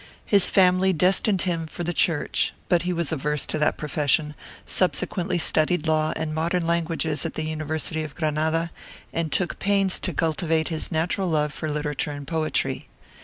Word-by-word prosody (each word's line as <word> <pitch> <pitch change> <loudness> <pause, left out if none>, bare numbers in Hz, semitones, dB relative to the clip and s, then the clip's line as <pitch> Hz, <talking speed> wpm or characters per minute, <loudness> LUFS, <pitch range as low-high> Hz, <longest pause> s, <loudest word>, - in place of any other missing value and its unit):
His 200 -3 +4
family 185 0 +4
destined 185 +3 +2
him 165 -3 -1
for 175 - -6
the 175 +1 -1
Church; 165 -2 +1 0.2
but 175 -1 +4
he 180 - -1
was 170 -3 -2
averse 150 -1 -1
to 155 - -2
that 150 - +2
profession, 150 0 +1 0.3
subsequently 180 0 0
studied 160 0 +1
law 155 -1 +2
and 155 -1 -3
modern 165 +2 0
languages 165 -2 0
at 165 - -4
the 155 - -2
University 155 0 -3
of 155 -2 -6
Granada, 160 +1 0 0.4
and 165 -2 -1
took 175 +6 -1
pains 195 -2 +2
to 185 - 0
cultivate 160 0 0
his 160 +1 -3
natural 175 +3 0
love 150 -2 +1
for 155 - -4
literature 150 0 -2
and 145 -1 -6
poetry. 155 +1 -1
160 Hz, 170 wpm, -24 LUFS, 155-175 Hz, 0.4 s, His